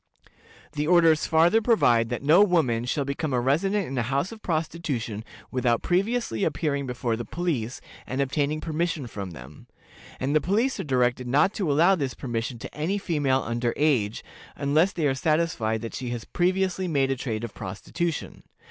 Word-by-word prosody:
The 150 Hz, 0 st, -2 dB
orders 165 Hz, -3 st, +4 dB
farther 170 Hz, +7 st, +4 dB
provide 120 Hz, -, +3 dB
that 120 Hz, +2 st, -3 dB
no 165 Hz, +8 st, +6 dB
woman 140 Hz, -, +2 dB
shall 140 Hz, +3 st, -1 dB
become 140 Hz, +1 st, -2 dB
a 125 Hz, -, +2 dB
resident 185 Hz, +11 st, +1 dB
in 135 Hz, -, -5 dB
a -, -, +2 dB
house 140 Hz, -, -1 dB
of 225 Hz, -1 st, -10 dB
prostitution 155 Hz, -, -3 dB, 0.3 s
without 125 Hz, -2 st, +1 dB
previously 195 Hz, -, 0 dB
appearing 140 Hz, -2 st, -1 dB
before 120 Hz, -2 st, -1 dB
the 120 Hz, -, -4 dB
police, 130 Hz, -5 st, -3 dB, 0.3 s
and 130 Hz, -, -3 dB
obtaining 145 Hz, +2 st, 0 dB
permission 165 Hz, -2 st, -2 dB
from 100 Hz, -5 st, -6 dB
them; 70 Hz, -2 st, -12 dB, 0.5 s
and 140 Hz, +3 st, 0 dB
the 155 Hz, -, +4 dB
police 225 Hz, +9 st, +1 dB
are -, -, -2 dB
directed 125 Hz, -2 st, +1 dB
not 145 Hz, +10 st, +3 dB
to 180 Hz, -8 st, -1 dB
allow 170 Hz, +7 st, +5 dB
this 140 Hz, -, -2 dB
permission 120 Hz, 0 st, -3 dB
to -, -, -9 dB
any 160 Hz, +7 st, -1 dB
female 145 Hz, -9 st, 0 dB
under 120 Hz, +1 st, -1 dB
age, 125 Hz, -9 st, +1 dB, 0.3 s
unless 155 Hz, +7 st, +2 dB
they 165 Hz, -4 st, -2 dB
are 140 Hz, -, +3 dB
satisfied 135 Hz, -7 st, 0 dB
that 115 Hz, -, -5 dB
she 125 Hz, -2 st, -4 dB
has 120 Hz, -2 st, -5 dB
previously 185 Hz, +1 st, 0 dB
made 140 Hz, -5 st, +1 dB
a -, -, +1 dB
trade 115 Hz, -4 st, -4 dB
of 115 Hz, -, -5 dB
prostitution. 160 Hz, -, -4 dB
140 Hz, 175 wpm, -26 LUFS, 120-170 Hz, 0.5 s, no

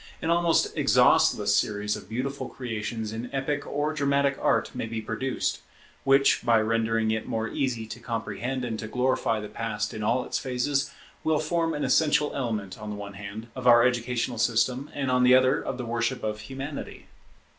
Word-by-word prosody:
An 165 Hz, -, -1 dB
almost 170 Hz, -1 st, +2 dB
exhaustless -, -, +4 dB
series 105 Hz, 0 st, 0 dB
of -, -, -10 dB
beautiful 135 Hz, +5 st, -3 dB
creations 110 Hz, -3 st, -4 dB
in 115 Hz, +2 st, -5 dB
epic 140 Hz, +1 st, -2 dB
or 145 Hz, +2 st, -1 dB
dramatic 140 Hz, -1 st, +1 dB
art -, -, +1 dB
may -, -, -4 dB
be 115 Hz, 0 st, -4 dB
produced, 115 Hz, +4 st, -2 dB, 0.4 s
which, 135 Hz, 0 st, +4 dB
by 115 Hz, -2 st, +4 dB
rendering 115 Hz, 0 st, +1 dB
it 110 Hz, 0 st, -2 dB
more 110 Hz, 0 st, -1 dB
easy 120 Hz, -4 st, -2 dB
to 110 Hz, -, -8 dB
comprehend 120 Hz, +2 st, -3 dB
and 110 Hz, -2 st, -4 dB
to 110 Hz, -, -5 dB
glorify 125 Hz, -2 st, 0 dB
the 105 Hz, -, -6 dB
Past 105 Hz, -1 st, -3 dB
in 110 Hz, -, -5 dB
all 120 Hz, +4 st, +1 dB
its -, -, -2 dB
phases, 135 Hz, +2 st, -1 dB, 0.3 s
will 160 Hz, -1 st, +2 dB
form 165 Hz, +1 st, 0 dB
an 150 Hz, -, -2 dB
essential 150 Hz, -1 st, +3 dB
element, 110 Hz, -7 st, -3 dB
on 105 Hz, 0 st, -6 dB
the 105 Hz, -, -4 dB
one 100 Hz, -1 st, -7 dB
hand, 105 Hz, +3 st, -8 dB
of 130 Hz, -1 st, -3 dB
our 120 Hz, -1 st, +8 dB
educational 120 Hz, -1 st, 0 dB
system, 125 Hz, +4 st, +1 dB
and 135 Hz, -2 st, -1 dB
on 125 Hz, 0 st, +3 dB
the 125 Hz, 0 st, +7 dB
other, 130 Hz, +2 st, +4 dB
of 135 Hz, -, -4 dB
the 125 Hz, -, -4 dB
worship 120 Hz, +2 st, -1 dB
of 105 Hz, 0 st, -2 dB
Humanity. 135 Hz, +6 st, -7 dB
120 Hz, 185 wpm, -27 LUFS, 110-135 Hz, 0.4 s, our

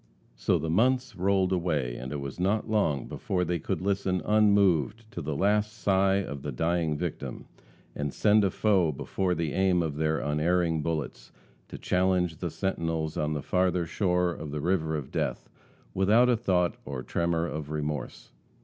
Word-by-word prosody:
So -, -, +1 dB
the 80 Hz, -, -3 dB
months 125 Hz, +4 st, +2 dB
rolled 95 Hz, 0 st, +1 dB
away 75 Hz, -9 st, 0 dB
and 65 Hz, +2 st, -6 dB
it 75 Hz, -, -3 dB
was 70 Hz, +3 st, -6 dB
not 100 Hz, +5 st, +1 dB
long 90 Hz, -, 0 dB
before 90 Hz, -2 st, -2 dB
they 85 Hz, 0 st, -1 dB
could -, -, -3 dB
listen 95 Hz, -2 st, 0 dB
unmoved 100 Hz, -, +3 dB
to 85 Hz, -, -5 dB
the 75 Hz, 0 st, -3 dB
last 105 Hz, +5 st, +1 dB
sigh 95 Hz, -3 st, +2 dB
of 70 Hz, -8 st, -3 dB
the 75 Hz, -, -4 dB
dying 80 Hz, +2 st, 0 dB
victim, 85 Hz, 0 st, -5 dB, 0.5 s
and 75 Hz, -1 st, -2 dB
send 105 Hz, +5 st, +3 dB
a 100 Hz, -, +3 dB
foe 95 Hz, -6 st, +2 dB
before 90 Hz, +6 st, -2 dB
the 80 Hz, -3 st, -2 dB
aim 95 Hz, -2 st, +2 dB
of 75 Hz, -3 st, -3 dB
their 80 Hz, 0 st, +1 dB
unerring 80 Hz, +2 st, +1 dB
bullets, 80 Hz, -1 st, -4 dB, 0.4 s
to -, -, -8 dB
challenge 90 Hz, -2 st, +1 dB
the 85 Hz, -, -3 dB
sentinels 80 Hz, -3 st, -2 dB
on 75 Hz, 0 st, -1 dB
the 75 Hz, -, -4 dB
farther 90 Hz, -1 st, +1 dB
shore 90 Hz, 0 st, +1 dB
of 80 Hz, -2 st, -7 dB
the 75 Hz, +1 st, -4 dB
river 80 Hz, -1 st, 0 dB
of 70 Hz, -3 st, -7 dB
death -, -, -2 dB, 0.5 s
without 110 Hz, +6 st, +4 dB
a 125 Hz, -, +4 dB
thought 90 Hz, -7 st, +1 dB
or 65 Hz, -2 st, -5 dB
tremor 85 Hz, -1 st, 0 dB
of 75 Hz, -3 st, -5 dB
remorse. 75 Hz, -1 st, -4 dB
90 Hz, 175 wpm, -28 LUFS, 75-95 Hz, 0.5 s, without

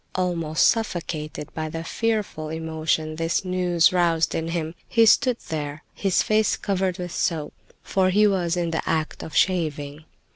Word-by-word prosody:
Almost 170 Hz, -4 st, +1 dB
suffocated 160 Hz, -, -2 dB
by 155 Hz, -1 st, -3 dB
the 165 Hz, +1 st, -5 dB
fearful 210 Hz, -6 st, -2 dB
emotion 160 Hz, -1 st, -2 dB
this 165 Hz, +3 st, 0 dB
news 180 Hz, -2 st, +2 dB
roused 170 Hz, -2 st, +2 dB
in 165 Hz, 0 st, -2 dB
him, 165 Hz, -1 st, -3 dB, 0.2 s
he 230 Hz, -1 st, +5 dB
stood 250 Hz, +2 st, +4 dB
there, 150 Hz, -1 st, -4 dB
his 195 Hz, -2 st, +1 dB
face 215 Hz, 0 st, +2 dB
covered 190 Hz, -2 st, -1 dB
with 180 Hz, -2 st, -5 dB
soap, 160 Hz, -3 st, -1 dB, 0.3 s
for 190 Hz, -1 st, +1 dB
he 210 Hz, +3 st, +4 dB
was 180 Hz, -4 st, +1 dB
in 170 Hz, -1 st, -1 dB
the 165 Hz, -, -1 dB
act 160 Hz, -1 st, -1 dB
of 160 Hz, -, -8 dB
shaving. 155 Hz, -4 st, 0 dB
165 Hz, 155 wpm, -24 LUFS, 160-185 Hz, 0.3 s, he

